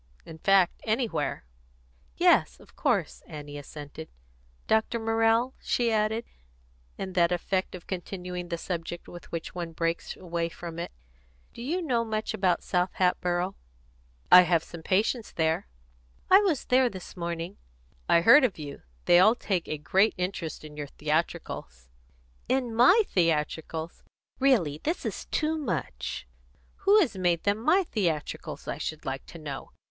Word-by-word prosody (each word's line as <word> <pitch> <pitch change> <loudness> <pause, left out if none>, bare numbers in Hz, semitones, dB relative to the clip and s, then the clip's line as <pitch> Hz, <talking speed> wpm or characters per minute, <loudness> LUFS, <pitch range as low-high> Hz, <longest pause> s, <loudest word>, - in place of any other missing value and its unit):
In 160 0 -10
fact, 195 0 +3
anywhere." 220 - -1 0.7
"Yes, - - +4
of - - -19
course," - - 0
Annie 145 -1 -8
assented. 145 +2 -9 0.6
"Dr. 220 +1 +2
Morrell," 225 +2 +2
she 235 -2 +1
added, 220 +1 +1 0.7
in 190 -1 -5
that 175 -2 +3
effect 185 +2 -1
of 180 - -10
continuing 180 -1 -5
the 170 - -2
subject 170 0 -5
with 175 - -11
which 165 -1 -5
one 170 -2 -5
breaks 165 +1 -2
away 170 -2 -2
from 170 0 -8
it, 170 - -4 0.6
"do - - -9
you 335 +9 -1
know 245 -7 +1
much 220 -1 -2
about 190 -4 +1
South 180 0 0
Hatboro'?" 180 0 +1 0.8
"I 180 - +11
have 170 -2 +2
some 170 - -10
patients 215 +7 0
there." 160 - 0 0.6
"I 380 - +10
was 370 -10 0
there 255 0 +4
this 185 -5 -10
morning 170 +1 -4 0.3
" - - -35
"I 170 - +6
heard 250 - +8
of 240 -7 +1
you. 145 -3 -8 0.2
They 175 - +7
all 215 +5 +6
take 190 -8 -2
a 155 - -3
great 190 +8 +2
interest 180 -4 -4
in 150 -1 -10
your 145 -1 -5
theatricals." 145 - -3 0.6
"In 255 -3 +1
my 265 - +6
theatricals? 160 - -1 0.4
Really 200 - +2
this 325 +4 -2
is - - -4
too 315 0 -1
much! 160 - -4 0.6
Who 415 +2 +8
has 255 - 0
made 175 -2 +1
them 205 +1 +1
my 335 - +3
theatricals, 175 - -3
I - - -3
should 155 0 -5
like 135 0 -4
to - - -10
know? 145 -4 -7
180 Hz, 150 wpm, -28 LUFS, 165-225 Hz, 0.8 s, I